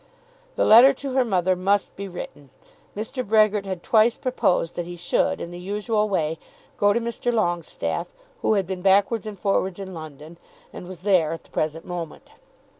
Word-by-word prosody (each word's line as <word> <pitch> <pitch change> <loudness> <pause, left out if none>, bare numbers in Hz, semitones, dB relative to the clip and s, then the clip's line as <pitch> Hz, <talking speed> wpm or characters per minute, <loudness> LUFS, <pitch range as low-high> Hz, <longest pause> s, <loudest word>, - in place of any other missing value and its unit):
The - - +2
letter 245 +5 +8
to 270 0 -6
her 260 -1 +3
mother 185 -5 +1
must 195 +2 0
be 200 0 -6
written. 160 -6 -9 0.5
Mr. 225 +4 -3
Brehgert 215 -2 +3
had 185 -3 -5
twice 225 +1 +3
proposed 180 -9 0
that 175 -1 -4
he 175 - -7
should, 175 0 0
in 170 - -6
the 175 - -8
usual 210 +3 -1
way, 160 -4 -1 0.4
go 205 0 +3
to 235 - +1
Mr. 235 +1 -2
Longestaffe, 175 -8 -2 0.3
who 220 - +2
had 195 -2 +1
been 185 0 -5
backwards 200 +3 +2
and 210 -2 -7
forwards 190 -1 0
in 190 -1 -7
London, 155 0 -10 0.3
and 180 - -9
was 185 -1 -10
there 180 -6 +3
at 165 - -8
the - - -25
present 155 +1 -2
moment. 175 -3 -7
195 Hz, 185 wpm, -24 LUFS, 175-215 Hz, 0.5 s, letter